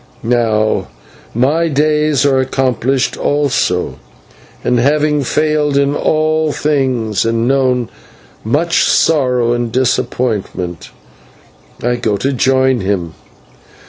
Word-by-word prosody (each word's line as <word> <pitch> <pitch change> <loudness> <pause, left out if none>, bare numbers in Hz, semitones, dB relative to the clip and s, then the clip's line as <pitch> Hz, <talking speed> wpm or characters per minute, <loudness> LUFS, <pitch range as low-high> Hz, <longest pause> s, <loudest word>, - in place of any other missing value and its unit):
Now 110 -2 +1 0.5
my 150 +8 +2
days 150 -1 +1
are 135 -2 +3
accomplished 130 0 0
also, 145 -2 0 0.6
and, 125 0 +1
having 150 +2 +1
failed 150 +1 0
in 140 0 +2
all 155 0 +1
things 130 -9 0
and 115 +1 0
known 130 -3 +1 0.6
much 155 +10 +1
sorrow 125 -6 +2
and 120 -1 -2
disappointment, 120 -8 -2 0.9
I 120 +1 0
go 110 -4 -1
to 135 +6 -1
join 130 0 +2
him. 95 -5 -2
130 Hz, 100 wpm, -15 LUFS, 120-145 Hz, 0.9 s, are